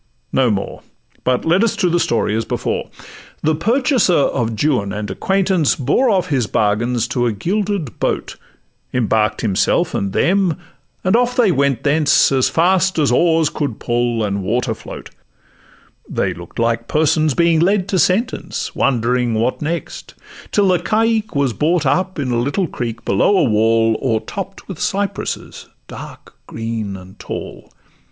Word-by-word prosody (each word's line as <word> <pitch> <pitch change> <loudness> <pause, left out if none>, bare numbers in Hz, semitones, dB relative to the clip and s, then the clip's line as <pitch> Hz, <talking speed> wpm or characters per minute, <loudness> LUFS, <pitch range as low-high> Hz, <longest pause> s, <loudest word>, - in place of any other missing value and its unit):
No 130 -2 +3
more; 100 -2 -3 0.4
But 125 0 0
let 175 +6 +3
us 230 - +1
to 190 - +1
the 175 0 +2
story 115 -7 0
as 115 - 0
before. - - -3 0.5
The 155 - +2
purchaser 235 - +2
of 125 -5 +1
Juan 125 -10 +1
and 105 0 -4
acquaintance 190 -5 +1
Bore 150 - +1
off 185 -4 +1
his 130 -7 0
bargains 115 +4 0
to 120 0 0
a - - +1
gilded 185 - -2
boat, - - -2 0.6
Embark'd 110 -3 +1
himself 100 -5 +1
and 100 -1 -1
them, 185 - +1 0.5
and 185 +3 +2
off 245 +1 +2
they 235 -7 +4
went 140 -5 +1
thence 145 0 +3
As 130 -2 +2
fast 185 +2 +2
as 145 -5 +2
oars 160 +3 +3
could 140 -7 -3
pull 120 -1 -1
and 100 -1 -2
water 115 +6 -1
float; - - -10 1.0
They - - -1
look'd 85 0 -12
like 115 0 0
persons 155 -2 +2
being 170 -1 +3
led 190 +2 +2
to 190 - +1
sentence, 200 - 0
Wondering 125 -2 +1
what 115 +4 -1
next, 165 +3 -5 0.4
till 200 -2 +3
the 180 -1 +3
caique 220 +1 0
was 140 -4 +1
brought 155 +5 +1
Up 185 +7 0
in 135 -4 -2
a 120 - +1
little 140 +9 0
creek 115 -6 -5
below 100 - +3
a - - +4
wall 115 0 +2
O'ertopp'd 135 - -3
with 190 -5 -7
cypresses, 200 +1 -3 0.2
dark - - -11
green 110 -3 -4
and 95 +1 -14
tall. - - -7
140 Hz, 155 wpm, -18 LUFS, 115-185 Hz, 1.0 s, they